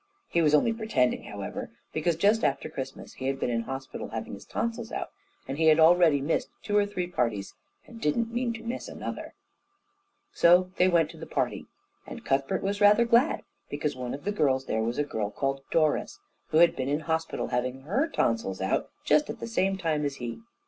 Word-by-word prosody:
He 170 Hz, -, +2 dB
was 150 Hz, -2 st, +5 dB
only 225 Hz, +10 st, +3 dB
pretending, 220 Hz, -, 0 dB
however, -, -, -6 dB, 0.2 s
because 155 Hz, +2 st, +1 dB
just 205 Hz, +6 st, +3 dB
after 140 Hz, -2 st, 0 dB
Christmas 135 Hz, 0 st, -7 dB
he 130 Hz, -, -5 dB
had 135 Hz, 0 st, -1 dB
been 120 Hz, -, 0 dB
in 115 Hz, -1 st, 0 dB
hospital 135 Hz, +2 st, -6 dB
having -, -, -5 dB
his -, -, -9 dB
tonsils 230 Hz, 0 st, -3 dB
out, -, -, -4 dB, 0.4 s
and 135 Hz, +3 st, -4 dB
he 160 Hz, -, +4 dB
had 155 Hz, 0 st, +6 dB
already 160 Hz, -3 st, +6 dB
missed 145 Hz, +4 st, 0 dB
two 205 Hz, -1 st, -2 dB
or 205 Hz, -1 st, +4 dB
three 185 Hz, -3 st, -3 dB
parties 115 Hz, -, -2 dB, 0.3 s
and 230 Hz, -1 st, -12 dB
didn't 230 Hz, +10 st, 0 dB
mean 240 Hz, 0 st, 0 dB
to 225 Hz, 0 st, -8 dB
miss 235 Hz, +2 st, -4 dB
another. -, -, -6 dB, 1.0 s
So 180 Hz, +2 st, +5 dB
they 180 Hz, -, +5 dB
went 165 Hz, -3 st, +3 dB
to 165 Hz, -, -14 dB
the 160 Hz, -, -8 dB
party, -, -, -2 dB, 0.4 s
and -, -, -9 dB
Cuthbert 140 Hz, +7 st, 0 dB
was 200 Hz, +1 st, -2 dB
rather 210 Hz, +3 st, +6 dB
glad, 235 Hz, +6 st, +3 dB, 0.3 s
because 145 Hz, 0 st, -2 dB
one 125 Hz, 0 st, -4 dB
of 145 Hz, -, -11 dB
the 205 Hz, -, -1 dB
girls 135 Hz, -9 st, +1 dB
there 110 Hz, -, -1 dB
was 115 Hz, +2 st, -1 dB
a 150 Hz, -, +2 dB
girl 110 Hz, -7 st, -3 dB
called 135 Hz, +4 st, -2 dB
Doris, 155 Hz, -2 st, +1 dB, 0.3 s
who 155 Hz, -, +1 dB
had 170 Hz, 0 st, +6 dB
been 130 Hz, +1 st, -2 dB
in 145 Hz, +2 st, 0 dB
hospital 160 Hz, +1 st, -2 dB
having 125 Hz, +2 st, -2 dB
her 210 Hz, -, 0 dB
tonsils 115 Hz, -, 0 dB
out 95 Hz, 0 st, 0 dB, 0.2 s
just 300 Hz, 0 st, +3 dB
at -, -, -5 dB
the -, -, -5 dB
same 195 Hz, -4 st, 0 dB
time 160 Hz, -5 st, 0 dB
as 140 Hz, -1 st, -2 dB
he. 120 Hz, -3 st, -6 dB
160 Hz, 205 wpm, -28 LUFS, 135-205 Hz, 1.0 s, had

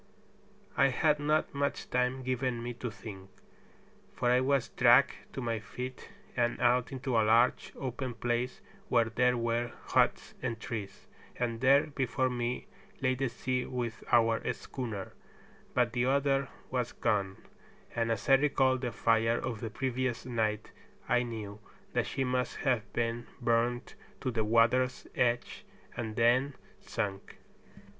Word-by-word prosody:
I -, -, +5 dB
had 150 Hz, +3 st, +2 dB
not 150 Hz, +1 st, +1 dB
much 140 Hz, 0 st, -2 dB
time 125 Hz, +1 st, +1 dB
given 125 Hz, -2 st, -1 dB
me 120 Hz, 0 st, -3 dB
to 120 Hz, +1 st, -5 dB
think, 100 Hz, -3 st, -10 dB, 0.9 s
for 120 Hz, -1 st, +2 dB
I 125 Hz, -, +5 dB
was 135 Hz, -1 st, +1 dB
dragged -, -, +5 dB, 0.2 s
to 135 Hz, -, -4 dB
my 115 Hz, -2 st, -1 dB
feet, 125 Hz, +4 st, -7 dB, 0.3 s
and 120 Hz, -1 st, +1 dB
out 125 Hz, 0 st, +3 dB
into 130 Hz, -1 st, -2 dB
a 115 Hz, -, +5 dB
large 115 Hz, +3 st, +3 dB
open 130 Hz, -1 st, -4 dB
place 120 Hz, +1 st, -1 dB, 0.3 s
where 120 Hz, -2 st, +4 dB
there 125 Hz, +2 st, +3 dB
were 120 Hz, +1 st, -1 dB, 0.2 s
huts -, -, +2 dB
and 115 Hz, -1 st, -2 dB
trees, 100 Hz, -4 st, -6 dB, 0.3 s
and 115 Hz, -2 st, -2 dB
there 135 Hz, +2 st, +6 dB
before 130 Hz, -3 st, -1 dB
me 120 Hz, 0 st, -2 dB, 0.3 s
lay 130 Hz, -1 st, +2 dB
the 130 Hz, 0 st, -1 dB
sea 125 Hz, +1 st, -2 dB
with 120 Hz, -3 st, -4 dB
our 115 Hz, -1 st, +4 dB
schooner, 115 Hz, -7 st, -6 dB, 0.6 s
but 120 Hz, -2 st, +2 dB
the 120 Hz, 0 st, +1 dB
other 135 Hz, 0 st, +2 dB, 0.2 s
was 125 Hz, -2 st, -1 dB
gone; 95 Hz, -2 st, 0 dB, 0.6 s
and 115 Hz, 0 st, +1 dB
as 110 Hz, -2 st, -2 dB
I 135 Hz, -, +7 dB
recalled 135 Hz, -2 st, +2 dB
the 125 Hz, -2 st, -2 dB
fire 115 Hz, +1 st, +2 dB
of 115 Hz, -4 st, -3 dB
the 115 Hz, -, -4 dB
previous 130 Hz, +1 st, -2 dB
night 110 Hz, -4 st, -1 dB, 0.4 s
I 125 Hz, -5 st, +3 dB
knew 110 Hz, -4 st, -5 dB, 0.3 s
that -, -, +1 dB
she 135 Hz, -, -1 dB
must 125 Hz, -1 st, -1 dB
have 125 Hz, -6 st, +1 dB
been 115 Hz, 0 st, -2 dB
burned 120 Hz, 0 st, +1 dB, 0.3 s
to 130 Hz, -, -1 dB
the 110 Hz, -2 st, 0 dB
water's 120 Hz, +3 st, +3 dB
edge 120 Hz, -1 st, 0 dB, 0.3 s
and 110 Hz, -2 st, -4 dB
then 125 Hz, +4 st, +3 dB, 0.2 s
sunk. 95 Hz, -1 st, -4 dB
120 Hz, 150 wpm, -31 LUFS, 115-130 Hz, 0.9 s, I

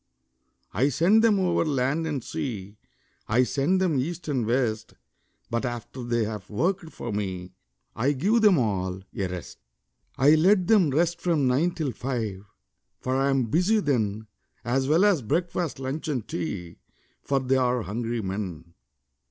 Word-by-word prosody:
I 130 Hz, +9 st, +2 dB
send 185 Hz, -, +4 dB
them 220 Hz, -3 st, +4 dB
over 180 Hz, -3 st, +2 dB
land 150 Hz, +2 st, 0 dB
and 145 Hz, -6 st, -3 dB
sea, 105 Hz, -6 st, -5 dB, 0.5 s
I 120 Hz, +4 st, +3 dB
send 145 Hz, +9 st, +1 dB
them 170 Hz, -7 st, +1 dB
east 165 Hz, +6 st, -4 dB
and 130 Hz, -7 st, -1 dB
west; 115 Hz, -3 st, -1 dB, 0.6 s
But 115 Hz, 0 st, 0 dB
after 120 Hz, +1 st, -5 dB
they 120 Hz, -1 st, 0 dB
have 105 Hz, -3 st, -5 dB
worked 165 Hz, -, -1 dB
for 115 Hz, -, -6 dB
me, 95 Hz, -3 st, -4 dB, 0.4 s
I 135 Hz, +6 st, +1 dB
give 205 Hz, -, +2 dB
them 205 Hz, -5 st, +6 dB
all 95 Hz, -6 st, -1 dB
a 95 Hz, -, -1 dB
rest. 90 Hz, -2 st, -8 dB, 0.6 s
I 140 Hz, +4 st, +6 dB
let 185 Hz, +4 st, +4 dB
them 195 Hz, -6 st, +4 dB
rest 170 Hz, +4 st, +1 dB
from 165 Hz, -6 st, +1 dB
nine 145 Hz, +8 st, +2 dB
till 155 Hz, -6 st, -2 dB
five, 115 Hz, -7 st, -3 dB, 0.6 s
For 130 Hz, 0 st, -2 dB
I 135 Hz, +1 st, +2 dB
am 135 Hz, -2 st, +2 dB
busy 180 Hz, -, +2 dB
then, 110 Hz, -, 0 dB, 0.4 s
As 130 Hz, +2 st, +1 dB
well 165 Hz, +7 st, +4 dB
as 195 Hz, -8 st, +3 dB
breakfast, 170 Hz, +5 st, -1 dB
lunch, 135 Hz, +4 st, -4 dB
and 130 Hz, -8 st, -2 dB
tea, 85 Hz, 0 st, -5 dB, 0.4 s
For 140 Hz, -1 st, 0 dB
they 130 Hz, 0 st, +1 dB
are 125 Hz, -2 st, +1 dB
hungry 115 Hz, +2 st, -3 dB
men. 90 Hz, -4 st, -5 dB
130 Hz, 160 wpm, -26 LUFS, 110-165 Hz, 0.6 s, them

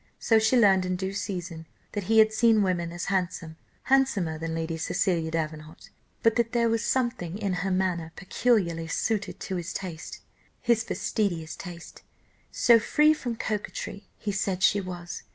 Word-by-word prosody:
So 225 Hz, -1 st, +3 dB
she 220 Hz, +4 st, +3 dB
learned 195 Hz, -5 st, +5 dB
in 185 Hz, 0 st, -1 dB
due 190 Hz, +1 st, -3 dB
season 175 Hz, -5 st, -5 dB, 0.2 s
that 205 Hz, -3 st, -4 dB
he 225 Hz, +3 st, +2 dB
had 220 Hz, 0 st, +6 dB
seen 220 Hz, -1 st, +4 dB
women 175 Hz, -3 st, -1 dB
as 175 Hz, +1 st, -5 dB
handsome, 175 Hz, -3 st, -2 dB, 0.3 s
handsomer 210 Hz, -13 st, +2 dB
than 165 Hz, 0 st, -3 dB
Lady 165 Hz, 0 st, -2 dB
Cecilia 170 Hz, 0 st, 0 dB
Davenant; 155 Hz, -1 st, -5 dB, 0.3 s
but 230 Hz, 0 st, +4 dB
that 235 Hz, 0 st, +1 dB
there 235 Hz, -1 st, +3 dB
was 225 Hz, 0 st, 0 dB
something 235 Hz, -9 st, -1 dB
in 200 Hz, -3 st, -1 dB
her 195 Hz, -, -1 dB
manner 180 Hz, -3 st, -1 dB
peculiarly 185 Hz, -5 st, 0 dB
suited 215 Hz, +5 st, -2 dB
to 190 Hz, -, -3 dB
his 175 Hz, 0 st, -5 dB
taste 175 Hz, -4 st, -6 dB, 0.4 s
his 235 Hz, -2 st, +2 dB
fastidious 175 Hz, -9 st, -2 dB
taste! 175 Hz, -2 st, -10 dB, 0.5 s
so 235 Hz, -1 st, +5 dB
free 300 Hz, +7 st, +4 dB
from 245 Hz, -6 st, -4 dB
coquetry, 210 Hz, -2 st, -4 dB
he 210 Hz, -, -3 dB
said 190 Hz, -1 st, -1 dB
she 200 Hz, +3 st, +4 dB
was. 175 Hz, -2 st, -7 dB
190 Hz, 165 wpm, -27 LUFS, 170-220 Hz, 0.5 s, had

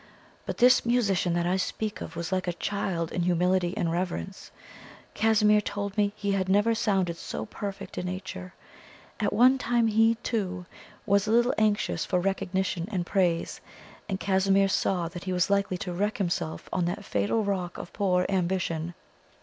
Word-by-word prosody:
But -, -, -3 dB
this 250 Hz, +1 st, +6 dB
musician 200 Hz, -8 st, +1 dB
that 175 Hz, 0 st, 0 dB
I 180 Hz, +2 st, +1 dB
speak 210 Hz, +3 st, -3 dB
of 165 Hz, -, -7 dB
was 170 Hz, +2 st, -4 dB
like 185 Hz, -1 st, -1 dB
a 175 Hz, -, 0 dB
child 175 Hz, -3 st, -2 dB
in 180 Hz, -, -1 dB
humility 180 Hz, +2 st, +1 dB
and 170 Hz, -6 st, 0 dB
reverence. 170 Hz, -, -4 dB, 0.6 s
Casimir 215 Hz, -1 st, +4 dB
told 200 Hz, -1 st, -4 dB
me 205 Hz, -1 st, +2 dB
he 205 Hz, -1 st, -2 dB
had 190 Hz, -1 st, 0 dB
never 205 Hz, +4 st, +4 dB
sounded 190 Hz, -6 st, 0 dB
so -, -, -5 dB
perfect 200 Hz, -2 st, -6 dB
a -, -, -3 dB
nature. 185 Hz, 0 st, -6 dB, 0.6 s
At 205 Hz, -, +1 dB
one 255 Hz, +5 st, +5 dB
time 240 Hz, -2 st, +2 dB
he, 225 Hz, +1 st, +4 dB
too, 185 Hz, -6 st, -2 dB, 0.4 s
was 200 Hz, 0 st, +2 dB
a -, -, +1 dB
little 240 Hz, +2 st, +4 dB
anxious 215 Hz, -1 st, +1 dB
for 180 Hz, -, 0 dB
recognition 190 Hz, -1 st, -1 dB
and 180 Hz, -4 st, -1 dB
praise, 175 Hz, -3 st, 0 dB, 0.5 s
and 190 Hz, -1 st, -2 dB
Casimir 195 Hz, 0 st, +3 dB
saw 180 Hz, -2 st, 0 dB
that 175 Hz, +2 st, -8 dB
he 185 Hz, -, -1 dB
was 180 Hz, +2 st, +1 dB
likely 200 Hz, -2 st, +1 dB
to 180 Hz, 0 st, -5 dB
wreck 205 Hz, +6 st, -1 dB
himself 175 Hz, -5 st, -2 dB
on 180 Hz, -, +1 dB
that 195 Hz, +4 st, -3 dB
fatal 105 Hz, -, 0 dB
rock 185 Hz, -3 st, -2 dB
of -, -, -8 dB
poor 180 Hz, -2 st, +1 dB
ambition. 175 Hz, -3 st, -1 dB
190 Hz, 175 wpm, -27 LUFS, 180-210 Hz, 0.6 s, this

